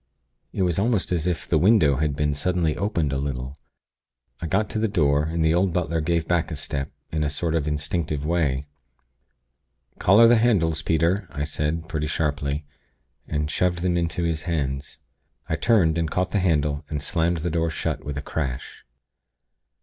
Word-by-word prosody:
It 95 - -1
was 90 -1 +1
almost 110 -3 +1
as 85 -1 0
if 90 -2 -2
the 80 - +2
window 85 - +4
had 75 0 0
been 75 0 0
suddenly 80 +1 0
opened 85 -8 -1
a 70 - 0
little. 65 -1 -4 0.9
I 85 - -3
got 95 +6 +1
to 110 - -1
the 110 - +2
door, 75 -7 +2
and 80 0 0
the 80 - +4
old 90 0 +2
butler 80 -2 0
gave 80 +1 0
back 85 -2 +1
a 80 - -4
step, 70 -2 -4 0.2
in 75 -1 0
a 75 - 0
sort 80 +2 -2
of 80 -3 0
instinctive 75 0 -2
way. 75 -5 0 1.3
'Collar 105 +5 +6
the 120 0 +6
candles, 85 -9 +2
Peter!' 85 +4 +1
I 75 -1 -3
said, 80 +2 -2
pretty 75 -3 -2
sharply, 75 -1 -1 0.6
and 75 0 -2
shoved 90 -1 0
them 90 -1 +1
into 85 0 -1
his 80 -2 -1
hands. 70 -2 -2 0.5
I 80 - 0
turned, 85 -5 +3
and 80 -2 0
caught 90 +2 -1
the 105 - +1
handle, 75 -4 +1
and 75 - -2
slammed 85 +4 0
the 85 - 0
door 85 0 +1
shut, 80 - -3
with 70 -1 -5
a 70 - -4
crash. 65 -6 -4
80 Hz, 180 wpm, -24 LUFS, 75-90 Hz, 1.3 s, Collar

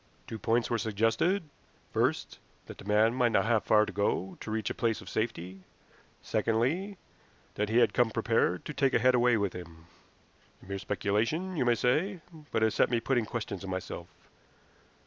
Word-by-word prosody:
Two 110 - -7
points 115 +3 +1
were 120 - +1
suggested 115 - +1 0.5
first, - - 0 0.3
that - - -11
the - - -11
man 105 +2 +3
might 125 -2 +2
not - - +3
have 115 -2 +2
far 105 0 +4
to - - -7
go 100 -2 -1
to - - -7
reach 110 -1 -2
a - - -2
place 115 -2 0
of - - -12
safety; 95 -4 -3 0.6
secondly, 155 - 0 0.6
that 105 0 -2
he 115 - +1
had 120 - +4
come 120 -2 +3
prepared 115 -5 0
to 150 - -5
take 135 -2 +1
a - - +4
head 125 +2 +4
away 120 -1 +4
with 100 -3 -1
him. 85 -2 -10 0.8
A - - -14
mere 100 +1 -4
speculation, 110 - -1
you 135 - 0
may 120 -1 +4
say, 160 - +1 0.3
but 110 - 0
it 110 - +3
set - - +3
me 120 -1 +1
putting 120 -1 0
questions 105 -5 -4
to 95 - -7
myself. 95 -1 -5
115 Hz, 185 wpm, -30 LUFS, 105-125 Hz, 0.8 s, far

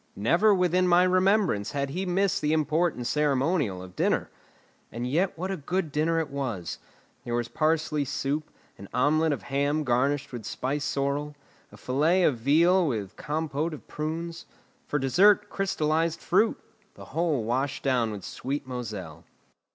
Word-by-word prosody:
Never 170 - +3
within 180 -1 +3
my 175 0 +5
remembrance 185 - +2
had 140 -1 -2
he 185 +5 -3
missed 190 +2 +1
the 150 +1 +1
important 155 -3 +1
ceremonial 140 - +1
of 90 -1 -12
dinner. - - 0 0.6
And 120 +2 -4
yet 165 +10 0
what 185 +3 -3
a 190 - -2
good 170 +2 -2
dinner 160 +3 +1
it 155 -3 -3
was! 125 -11 -4 0.4
There 120 - -3
was 120 -1 -1
parsley 155 -1 +1
soup, 140 +3 -2 0.3
an 100 - -10
omelette 155 +5 +3
of 145 - -3
ham 145 +2 0
garnished 135 +2 0
with 120 -2 -6
spiced 140 +7 -2
sorrel, 140 +2 -2 0.4
a - - -14
fillet 155 +8 +2
of 135 -8 +2
veal 170 +8 +4
with 105 -8 -3
compote 155 +1 -2
of - - -15
prunes; 165 +2 -5 0.4
for 145 - 0
dessert, 200 +10 +4
crystallised 165 -4 0
fruit; 205 +6 +2 0.4
the - - -11
whole 160 -6 +1
washed 130 +5 -1
down 125 -4 +1
with 105 -3 -6
sweet 140 +2 -4
Moselle. 105 -11 -6
150 Hz, 155 wpm, -27 LUFS, 130-170 Hz, 0.6 s, my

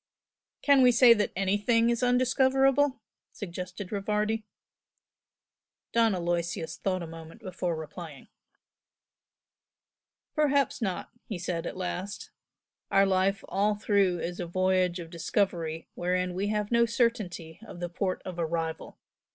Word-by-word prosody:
"Can 280 -2 +6
we 250 -1 +7
say 240 0 +8
that 210 -2 0
anything 205 +5 +2
is 235 - -1
undiscoverable?" 265 +2 +3 0.3
suggested 180 0 -7
Rivardi. 210 +2 -1 1.5
Don 230 -3 +3
Aloysius 170 -2 -2
thought 185 -2 -1
a - - -4
moment 165 +5 -11
before 180 -4 -3
replying. 160 -1 -8 2.1
"Perhaps 285 -4 +2
not!" 190 -5 -3 0.2
he 210 - -4
said, 175 -1 -3
at - - -6
last 185 +2 -5 0.6
"Our 195 0 +5
life 195 +1 +1
all 205 +2 +1
through 200 -3 +2
is 175 +1 -4
a 175 - -3
voyage 185 0 +1
of 165 -2 -8
discovery 165 -2 -1
wherein 180 +1 -1
we 195 +3 -1
have 210 0 -1
no 235 0 +4
certainty 215 -9 -1
of 180 - -10
the 175 - -2
port 185 +2 -2
of 180 -2 -6
arrival. 165 -1 -3
190 Hz, 125 wpm, -28 LUFS, 175-225 Hz, 2.1 s, say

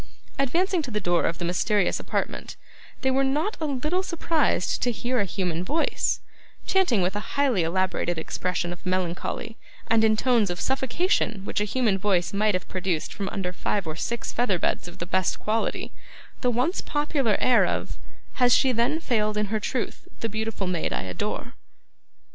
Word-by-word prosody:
Advancing 345 +7 +2
to 280 - -5
the 210 -3 -1
door 175 -3 +2
of 165 - -1
the 175 - -3
mysterious 180 +2 +1
apartment, - - -3 0.5
they 265 - +2
were 270 +1 +3
not 300 +10 0
a 310 - 0
little 300 +7 0
surprised 330 - 0
to 245 - +2
hear 245 +2 -1
a 205 - +2
human 180 -3 -2
voice, 310 - 0 0.4
chanting 305 - +3
with 185 +3 0
a 210 - -5
highly 265 -9 +3
elaborated 175 0 0
expression 175 +2 -2
of 175 - -13
melancholy, 185 +4 -2 0.3
and 225 0 +4
in 215 -1 +4
tones 235 -4 +3
of 175 0 -3
suffocation 265 - 0
which - - -1
a - - +2
human 215 -3 +1
voice 185 -3 +1
might 210 0 +2
have 185 - -3
produced 180 -4 -2
from 200 -2 -3
under 185 -3 -3
five 200 +1 -1
or 155 -1 -4
six 235 +7 -3
feather 225 -6 +2
beds 175 - -1
of 175 - -10
the 170 - -4
best 185 +1 0
quality, 220 +1 -1 0.5
the 250 - +3
once 250 - +1
popular 290 -6 +1
air 250 - +5
of - - -2 0.4
'Has 245 -1 +6
she 265 - +4
then 250 +6 +1
failed 215 -8 0
in 210 - +2
her 215 - +2
truth, 235 +3 -3
the 225 - -1
beautiful 220 -1 -2
maid 180 -3 -1
I - - -1
adore? 90 -2 -4
215 Hz, 180 wpm, -26 LUFS, 185-260 Hz, 0.5 s, Has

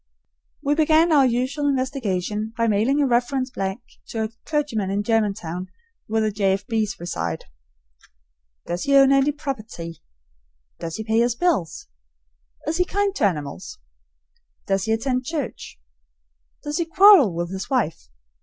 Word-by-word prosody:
We 285 0 +2
began 315 +2 +4
our 280 -4 +5
usual 260 +4 -1
investigation 220 -6 -2
by 230 0 +2
mailing 225 +7 +2
a 285 - +3
reference 255 +1 0
blank 195 0 -3 0.3
to 225 -1 -3
a 220 - -2 0.2
clergyman 285 -10 -1
in 200 +1 -1
Germantown, 195 -5 -1 0.4
where 220 +1 0
the 215 -1 +1
J. 195 -2 +1
F. 195 +1 -3
B.'s 220 -2 -1
reside. 85 - -4 1.2
Does 175 +1 -3
he 280 0 +3
own 275 0 +7
any 275 +1 +4
property? 220 - -6 0.8
Does 165 -1 -5
he 220 - -4
pay 220 +1 +1
his 235 0 +2
bills? 240 - 0 0.8
Is 310 +3 -1
he 360 - +3
kind 400 +1 0
to - - +2
animals? 175 - -3 0.9
Does 195 -1 0
he 220 - -1
attend 250 +3 0
church? 295 - -5 0.8
Does 295 +2 -3
he 340 - +1
quarrel 365 - +7
with 175 +1 -3
his 190 0 -5
wife? 205 - -1
230 Hz, 150 wpm, -23 LUFS, 195-280 Hz, 1.2 s, own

